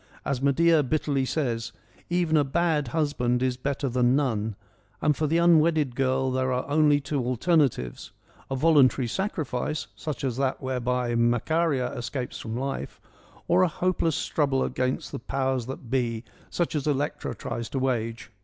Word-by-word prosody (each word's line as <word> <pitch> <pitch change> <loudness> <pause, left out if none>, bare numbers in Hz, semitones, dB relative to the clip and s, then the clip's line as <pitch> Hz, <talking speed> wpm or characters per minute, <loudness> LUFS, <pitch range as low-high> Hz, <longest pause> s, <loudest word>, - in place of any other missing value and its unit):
As 135 -2 -1
Medea 155 +4 +4
bitterly 145 -1 0
says 120 -6 -2 0.2
' - - -27
Even 175 -2 +1
a 150 - +5
bad 150 0 +1
husband 125 -3 0
is 130 -1 +1
better 140 +2 -2
than 125 0 +2
none,' 110 -7 0 0.4
and 150 - +2
for 155 +1 0
the 165 +3 +2
unwedded 160 -5 +4
girl 130 0 +1
there 130 0 0
are 125 +1 -1
only 145 0 +4
two 140 -1 -2
alternatives, 130 - 0 0.4
a 135 - -1
voluntary 135 -3 +4
sacrifice, 150 - -2
such 150 -3 -5
as 130 -3 -1
that 135 -1 0
whereby 125 -2 -1
Macaria 125 +4 +1
escapes 125 +1 -4
from 110 +1 -5
life, 135 +2 -4 0.5
or 175 +2 +4
a 185 - +5
hopeless 170 -2 0
struggle 140 -3 0
against 130 +1 -2
the - - -5
powers 130 0 -1
that 130 -2 -8
be, 120 -3 0 0.3
such 175 - -1
as 150 -2 -2
Elect 145 0 -1
r - - -3
a - - -13
tries 115 -1 -5
to - - -4
wage. 115 -3 -2
135 Hz, 165 wpm, -26 LUFS, 125-155 Hz, 0.5 s, a